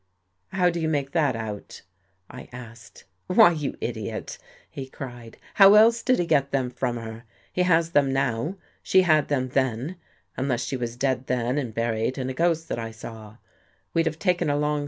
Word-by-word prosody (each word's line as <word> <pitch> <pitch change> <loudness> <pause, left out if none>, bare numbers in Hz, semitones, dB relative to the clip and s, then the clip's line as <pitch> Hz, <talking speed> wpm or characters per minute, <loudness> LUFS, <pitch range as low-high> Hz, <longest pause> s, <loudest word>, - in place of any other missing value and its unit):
"How 180 -2 +2
do 170 - -3
you 160 - 0
make 140 -3 -1
that 150 -6 +1
out?" 110 -3 -7 0.4
I 125 - -11
asked. 120 -1 -12
" 90 - -47
Why, 180 -1 +7
you 150 -4 -3
idiot," - - -5 0.3
he 135 -3 -7
cried, 120 -4 -9
" - - -24
how 195 +1 +10
else 230 +2 +6
did 255 0 +2
he 175 - 0
get 140 -4 +2
them 130 -3 0
from 125 -1 -2
her? 115 +1 -8 0.3
He 180 - 0
has 170 -2 +3
them 140 -4 +3
now; 135 +5 -1 0.3
she 190 0 +4
had 155 -4 +3
them 130 -3 -1
then, 130 +6 -1 0.4
unless 130 -2 -1
she 135 - -3
was 120 -2 -4
dead 130 0 -1
then 125 +2 0
and 125 -5 -4
buried 115 +2 -1
and 130 -1 -2
a - - -4
ghost 165 +2 +1
that - - -2
I 115 0 -4
saw. 110 -1 -10
130 Hz, 175 wpm, -25 LUFS, 120-160 Hz, 0.4 s, how